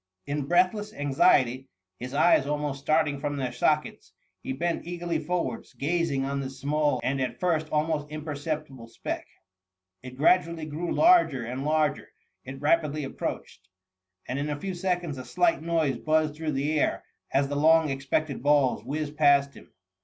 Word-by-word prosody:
In 145 -1 -3
breathless 185 +5 +1
anxiety, 135 -2 +2 0.3
his 125 +3 -6
eyes 150 -2 +4
almost 145 -1 -2
starting 155 -1 +1
from 145 0 -3
their 130 -3 -2
sockets, 150 +5 -1 0.3
he - - -5
bent 170 +6 -2
eagerly 175 -2 -2
forwards, 160 -7 -3
gazing 145 -2 0
on 140 0 -2
this 135 0 -6
small 150 +1 +1
and 135 0 0
at 130 - -3
first 160 -4 0
almost 150 -1 0
im 155 0 -7
perceptible 145 -4 -5
speck. 115 - -5 0.7
It 130 0 -10
gradually 170 +1 +2
grew 155 +3 -4
larger 335 - +4
and 125 +3 -4
larger— 155 0 0 0.3
it 135 +1 -8
rapidly 150 -1 +1
approached! 95 -7 -6 0.6
and 130 +2 -3
in 145 +1 -2
a 145 -1 -3
few 190 +4 -4
seconds 175 -5 -2
a - - -6
slight 335 - +1
noise 160 -6 0
buzzed 155 -1 +1
through 155 -1 -3
the 145 +3 0
air - - 0 0.3
as 140 0 +2
the 145 - -4
long 160 +1 +4
expected 135 +1 -2
balls 145 -2 +2
whizzed 150 0 -4
past 140 -2 +4
him. - - -15
150 Hz, 160 wpm, -27 LUFS, 135-160 Hz, 0.7 s, eyes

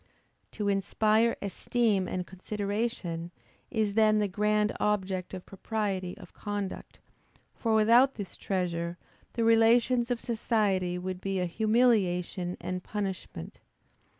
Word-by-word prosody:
To 210 - -2
inspire 215 +3 +2
esteem 200 -1 0
and 180 0 -3
consideration, 200 -2 -3 0.4
is 215 -4 0
then 215 0 +4
the 210 -1 +2
grand 210 +2 +1
object 190 -3 -1
of 185 - -8
propriety 195 -2 -3
of 180 - -13
conduct; 205 -2 -5 0.6
for 225 -2 0
without 235 +5 +5
this 200 -4 -7
treasure, 175 -3 -2 0.4
the 230 - 0
relations 235 +2 +4
of 245 -1 0
society 205 -6 0
would 185 0 -5
be 195 -1 -1
a 180 - +1
humiliation 190 -4 +1
and 180 0 -4
punishment. 195 - -5
205 Hz, 120 wpm, -29 LUFS, 185-220 Hz, 0.6 s, without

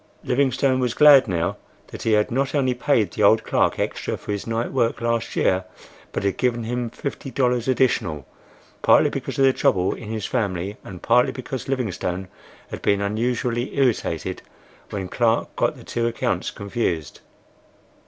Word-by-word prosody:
Livingstone 130 0 +1
was 125 -2 -1
glad 145 -4 +7
now 85 -3 -1 0.3
that - - -9
he 110 - +1
had 105 +2 +2
not 135 +4 0
only 130 -3 +2
paid 120 -7 +1
the - - -4
old 110 +2 +5
clerk - - +1
extra - - -2
for - - -7
his 100 +1 -4
night 115 +1 -2
work 120 -4 0
last 115 0 -1
year, 95 0 +2 0.5
but - - -3
had 100 -1 0
given 120 -2 0
him 120 +1 -2
fifty 140 +2 -6
dollars 125 -2 0
additional, 120 - +1 0.6
partly - - +5
because - - -5
of 135 - +4
the 135 - +5
trouble 90 -5 +2
in 110 - -9
his 110 -2 -3
family, 100 -4 -2
and 90 -3 -10
partly 120 +1 +4
because 130 0 -6
Livingstone 95 -7 -2 0.4
had - - -6
been 100 - +2
unusually 120 +5 -1
irritated 130 -4 0 0.5
when 95 -3 -4
Clark 115 +3 0
got - - +1
the - - -12
two 115 0 -1
accounts 115 - -1
confused. 100 - -3
115 Hz, 165 wpm, -23 LUFS, 100-125 Hz, 0.6 s, glad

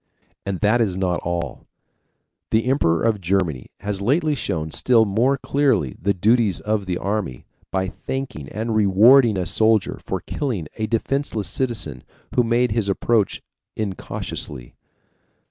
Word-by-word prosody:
And 95 -3 -3
that 110 +3 +3
is 95 -5 0
not 90 -2 0
all: 85 0 -4 0.8
the 110 +1 +2
Emperor 85 - +2
of 110 -3 +1
Germany 85 -7 -1
has 100 0 -3
lately 150 - +2
shown 80 - -3
still 115 +3 +4
more 120 +7 +2
clearly 135 - +1
the 100 - +2
duties 105 -1 +3
of 105 -2 -2
the 90 -1 -1
army, 100 - -3 0.2
by 95 0 -1
thanking 125 - -5
and 110 +2 -3
rewarding 110 +3 +6
a 90 - -1
soldier 110 +3 +2
for - - -3
killing 115 - -3
a 110 -1 -1
defenseless 115 -3 -1
citizen 120 - -2 0.3
who 125 - +4
made 120 +1 +2
his 105 -2 0
approach 105 +1 +1 0.3
incautiously. 75 - -5
105 Hz, 140 wpm, -22 LUFS, 95-120 Hz, 0.8 s, rewarding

